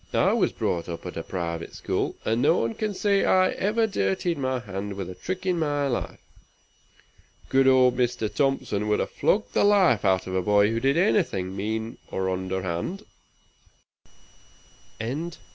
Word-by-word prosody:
I -, -, +3 dB
was -, -, +2 dB
brought 85 Hz, 0 st, -2 dB
up 85 Hz, +1 st, -6 dB
at 90 Hz, -, -6 dB
a 80 Hz, -, -3 dB
private 85 Hz, -1 st, -5 dB
school, -, -, -2 dB
and 115 Hz, +2 st, +1 dB
no 160 Hz, +6 st, +4 dB
one 115 Hz, 0 st, 0 dB
can 210 Hz, -, -3 dB
say 200 Hz, 0 st, +2 dB
I 185 Hz, 0 st, +4 dB
ever 220 Hz, +3 st, +1 dB
dirtied 155 Hz, -, -1 dB
my 130 Hz, -1 st, 0 dB
hands 100 Hz, -2 st, -5 dB
with 95 Hz, -2 st, -5 dB
a -, -, -9 dB
trick 185 Hz, -, -5 dB
in 180 Hz, -2 st, +1 dB
my 145 Hz, -2 st, 0 dB
life. 125 Hz, -, -3 dB, 1.3 s
Good 135 Hz, 0 st, +4 dB
old 130 Hz, -1 st, +5 dB
Mr. 125 Hz, -3 st, 0 dB
Thompson 130 Hz, -6 st, 0 dB
would 105 Hz, -, +2 dB
have -, -, -2 dB
flogged 215 Hz, +2 st, 0 dB
the -, -, +3 dB
life 195 Hz, -, +4 dB
out 95 Hz, -2 st, +2 dB
of 95 Hz, -, -5 dB
a 95 Hz, -, +1 dB
boy 105 Hz, +2 st, +3 dB
who 115 Hz, -, 0 dB
did 135 Hz, +5 st, +2 dB
anything 130 Hz, -, +1 dB
mean 110 Hz, +3 st, -3 dB
or 95 Hz, 0 st, -1 dB
underhand." 95 Hz, -, -3 dB
115 Hz, 165 wpm, -25 LUFS, -, 1.3 s, old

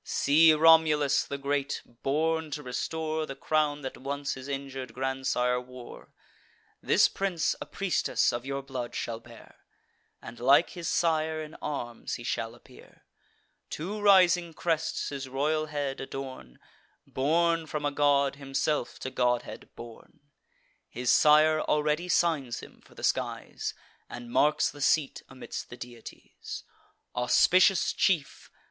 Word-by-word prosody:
See 155 Hz, +3 st, +4 dB
Romulus 155 Hz, -2 st, +4 dB
the 140 Hz, -, -5 dB
great, 140 Hz, 0 st, -2 dB
born 155 Hz, +6 st, -1 dB
to 150 Hz, -, -11 dB
restore 155 Hz, +4 st, -3 dB
The 135 Hz, -, -6 dB
crown 150 Hz, 0 st, 0 dB
that 130 Hz, -, -6 dB
once 140 Hz, +1 st, -3 dB
his 130 Hz, 0 st, -9 dB
injur'd 135 Hz, -3 st, -6 dB
grandsire 130 Hz, -1 st, 0 dB
wore. 125 Hz, -1 st, -12 dB, 0.7 s
This -, -, +4 dB
prince 190 Hz, -4 st, -1 dB
a -, -, -6 dB
priestess 195 Hz, -4 st, 0 dB
of 120 Hz, 0 st, -3 dB
your 135 Hz, +1 st, -4 dB
blood 130 Hz, -3 st, -6 dB
shall 115 Hz, -1 st, -3 dB
bear, 115 Hz, 0 st, -16 dB, 0.6 s
And 115 Hz, +1 st, -11 dB
like 140 Hz, +7 st, +4 dB
his 170 Hz, -2 st, -6 dB
sire 160 Hz, -1 st, 0 dB
in 155 Hz, 0 st, -10 dB
arms 120 Hz, -6 st, -4 dB
he -, -, -8 dB
shall -, -, -3 dB
appear. -, -, -18 dB, 0.7 s
Two 200 Hz, +7 st, -5 dB
rising 180 Hz, -4 st, +4 dB
crests, 165 Hz, -2 st, -1 dB
his 135 Hz, -2 st, -6 dB
royal 155 Hz, +4 st, 0 dB
head 145 Hz, -2 st, -3 dB
adorn; 130 Hz, -, -8 dB, 0.5 s
Born 165 Hz, +4 st, +1 dB
from 150 Hz, 0 st, -4 dB
a 145 Hz, -, +1 dB
god, 140 Hz, -1 st, +2 dB
himself 140 Hz, 0 st, -2 dB
to 130 Hz, -, -4 dB
godhead 125 Hz, -1 st, -1 dB
born: 120 Hz, +6 st, -13 dB, 0.7 s
His 125 Hz, +1 st, 0 dB
sire 155 Hz, +1 st, +5 dB
already 150 Hz, +4 st, 0 dB
signs 155 Hz, -10 st, +1 dB
him -, -, -14 dB
for -, -, -21 dB
the -, -, -11 dB
skies, -, -, -2 dB, 0.3 s
And 120 Hz, -1 st, -9 dB
marks 150 Hz, +4 st, +3 dB
the 145 Hz, -, -12 dB
seat 145 Hz, 0 st, +1 dB
amidst 135 Hz, -1 st, -7 dB
the 120 Hz, -, -10 dB
deities. 120 Hz, -2 st, -10 dB, 0.5 s
Auspicious 180 Hz, +9 st, +4 dB
chief! 165 Hz, -8 st, 0 dB
145 Hz, 135 wpm, -28 LUFS, 130-155 Hz, 0.7 s, sire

